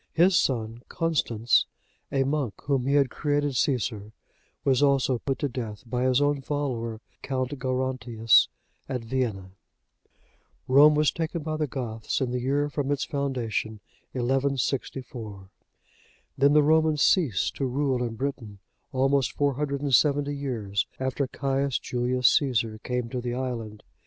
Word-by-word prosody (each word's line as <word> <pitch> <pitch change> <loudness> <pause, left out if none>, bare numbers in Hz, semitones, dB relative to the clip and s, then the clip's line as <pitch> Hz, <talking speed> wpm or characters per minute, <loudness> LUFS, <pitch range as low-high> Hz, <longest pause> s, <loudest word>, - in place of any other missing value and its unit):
His 175 +3 +4
son 115 -5 0
Constans, 120 -8 +1 0.4
a 135 -1 +2
monk, 135 -5 -1
whom 135 -2 0
he 140 - +2
had 140 -3 +3
created 145 -2 0
Caesar, 110 -5 -1 0.5
was 135 -1 +2
also 135 -3 +3
put 135 +1 -2
to 145 - -1
death 115 -5 -6
by 125 +2 -1
his 130 0 +3
own 145 -1 +1
follower 125 -6 -3 0.2
Count 130 -1 -2
Gerontius,(71) 125 -3 +2 0.5
at 125 - -2
Vienne. 115 -7 -2 1.2
Rome 145 +3 +7
was 150 -2 +3
taken 165 -1 -3
by 155 0 -2
the 155 -1 -1
Goths, 115 -4 -3
in 130 -2 -1
the 125 - -1
year 140 +4 0
from 145 -1 -2
its 145 -1 0
foundation, 120 -6 -2 0.4
1164.(72) 125 -5 -2 0.9
Then 140 +2 +4
the 150 0 +6
Romans 155 0 +3
ceased 140 - +2
to 135 - -1
rule 130 -1 0
in 115 -2 -2
Britain, 120 -5 -4 0.3
almost 135 0 +1
470 145 0 +1
years 115 -8 -2
after 130 +1 -1
Caius 135 0 -1
Julius 125 0 0
Caesar 115 -6 +2
came 125 0 -3
to 125 0 -3
the 120 0 -3
island. 115 -5 -4
130 Hz, 135 wpm, -26 LUFS, 120-140 Hz, 1.2 s, Rome